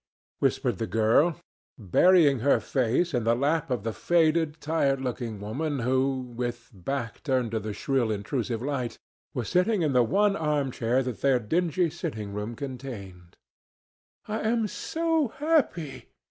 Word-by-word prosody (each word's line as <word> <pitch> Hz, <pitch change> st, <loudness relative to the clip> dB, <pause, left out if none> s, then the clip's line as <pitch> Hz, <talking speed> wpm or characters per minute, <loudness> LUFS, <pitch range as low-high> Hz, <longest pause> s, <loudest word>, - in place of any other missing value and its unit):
whispered -, -, 0 dB
the 115 Hz, -, -2 dB
girl, 115 Hz, +11 st, +3 dB, 0.4 s
burying 140 Hz, -, +4 dB
her 140 Hz, +5 st, +3 dB
face 135 Hz, +7 st, 0 dB
in 120 Hz, -3 st, +1 dB
the 115 Hz, +1 st, +3 dB
lap 145 Hz, +5 st, 0 dB
of 125 Hz, -6 st, -1 dB
the 115 Hz, 0 st, -2 dB
faded, 160 Hz, -1 st, +2 dB
tired 145 Hz, -3 st, +1 dB
looking 120 Hz, -4 st, -4 dB
woman 140 Hz, +9 st, -3 dB
who, 130 Hz, +2 st, +1 dB
with 120 Hz, -1 st, -5 dB
back 115 Hz, +5 st, -4 dB
turned 130 Hz, -5 st, 0 dB
to 110 Hz, -, 0 dB
the 105 Hz, 0 st, -5 dB
shrill 125 Hz, +2 st, 0 dB
intrusive 115 Hz, +2 st, -2 dB
light, 130 Hz, -4 st, -2 dB, 0.4 s
was 120 Hz, -4 st, -2 dB
sitting 180 Hz, +1 st, +2 dB
in 150 Hz, -3 st, +1 dB
the 125 Hz, -, +5 dB
one 200 Hz, -, +2 dB
arm 150 Hz, -5 st, 0 dB
chair 125 Hz, +2 st, +1 dB
that 125 Hz, -3 st, -5 dB
their 135 Hz, -2 st, +4 dB
dingy 170 Hz, -, +1 dB
sitting 105 Hz, -6 st, -5 dB
room 105 Hz, +3 st, -4 dB
contained. 115 Hz, -10 st, -8 dB, 0.9 s
"I 215 Hz, +1 st, -2 dB
am 225 Hz, 0 st, +1 dB
so 325 Hz, -, 0 dB
happy!" 280 Hz, -, 0 dB
130 Hz, 150 wpm, -27 LUFS, 115-160 Hz, 0.9 s, the